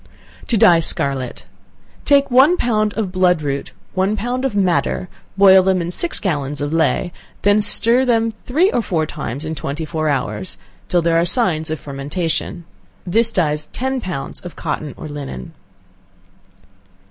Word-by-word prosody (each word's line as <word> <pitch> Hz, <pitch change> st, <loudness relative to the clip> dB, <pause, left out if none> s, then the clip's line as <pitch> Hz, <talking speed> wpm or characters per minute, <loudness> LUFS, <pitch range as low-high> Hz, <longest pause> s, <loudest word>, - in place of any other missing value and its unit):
To 235 Hz, -, +1 dB
Dye 175 Hz, -4 st, +6 dB
Scarlet. 135 Hz, -5 st, -2 dB, 0.6 s
Take 280 Hz, -2 st, +3 dB
one 275 Hz, +8 st, +5 dB
pound 215 Hz, -5 st, 0 dB
of 210 Hz, -5 st, -2 dB
blood 180 Hz, -3 st, +2 dB
root, 140 Hz, -1 st, -3 dB
and -, -, -28 dB, 0.2 s
one 195 Hz, +3 st, 0 dB
pound 250 Hz, +4 st, -2 dB
of 255 Hz, -6 st, -2 dB
madder, 185 Hz, -1 st, 0 dB, 0.3 s
boil 190 Hz, -1 st, +7 dB
them 185 Hz, 0 st, +1 dB
in 170 Hz, 0 st, -3 dB
six 340 Hz, -, +1 dB
gallons 145 Hz, -6 st, -2 dB
of 145 Hz, +1 st, -3 dB
ley, 165 Hz, +2 st, +1 dB, 0.3 s
then 205 Hz, +1 st, +4 dB
stir 230 Hz, +4 st, +4 dB
them 230 Hz, -3 st, +1 dB
three 335 Hz, -, +3 dB
or 240 Hz, -, +1 dB
four 165 Hz, -7 st, -1 dB
times 140 Hz, -1 st, -6 dB
in 160 Hz, -, -3 dB
twenty 150 Hz, +1 st, -4 dB
four 155 Hz, 0 st, -2 dB
hours, 105 Hz, -8 st, -2 dB, 0.3 s
till 175 Hz, -1 st, +2 dB
there 165 Hz, 0 st, +3 dB
are 170 Hz, -, +2 dB
signs 175 Hz, -7 st, 0 dB
of 155 Hz, -1 st, -3 dB
fermentation. 155 Hz, +5 st, -4 dB, 0.4 s
This 225 Hz, +5 st, +3 dB
dyes 150 Hz, -6 st, 0 dB
ten 265 Hz, 0 st, -2 dB
pounds 180 Hz, -10 st, -5 dB
of 180 Hz, -, -10 dB
cotton 150 Hz, -2 st, -4 dB
or -, -, -7 dB
linen. 140 Hz, -, -7 dB
180 Hz, 160 wpm, -19 LUFS, 150-220 Hz, 0.6 s, boil